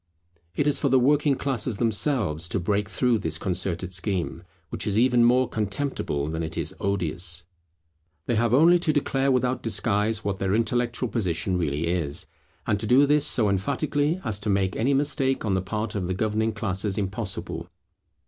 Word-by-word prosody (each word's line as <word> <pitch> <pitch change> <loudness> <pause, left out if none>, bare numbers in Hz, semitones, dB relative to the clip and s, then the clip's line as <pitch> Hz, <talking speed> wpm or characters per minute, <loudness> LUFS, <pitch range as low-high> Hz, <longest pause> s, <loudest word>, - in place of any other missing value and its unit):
It 145 - +1
is 145 -1 +3
for 140 - +1
the 130 - +4
working 145 +2 +3
classes 125 -5 0
themselves 105 - 0
to 100 - -1
break 100 +3 -1
through 125 -3 +1
this 80 -4 -1
concerted 90 0 -2
scheme, 90 0 -2 0.3
which - - -4
is 105 0 +1
even 120 0 +4
more 125 +2 +4
contemptible 105 - -2
than 80 +1 -3
it 80 0 -5
is 80 -2 -2
odious. 90 -3 -1 0.8
They - - -1
have 115 +1 +1
only 165 +7 +5
to 170 -2 +1
declare 140 -2 +1
without 125 0 0
disguise 105 0 0
what 100 -1 -2
their 95 +1 0
intellectual 120 +2 0
position 95 -5 -1
really 80 -2 -1
is; 85 -4 0 0.4
and 105 - 0
to 110 - -3
do 130 +5 +5
this 150 0 +3
so 110 -5 +2
emphatically 145 - 0
as 105 -3 -3
to 105 +1 -4
make 95 -1 +1
any 135 +5 +1
mistake 135 -3 +1
on 100 - 0
the 95 - +1
part 105 +3 -3
of 95 -5 -2
the 95 - -2
governing 110 +2 0
classes 100 -1 -1
impossible. 100 0 -4
105 Hz, 175 wpm, -25 LUFS, 95-125 Hz, 0.8 s, only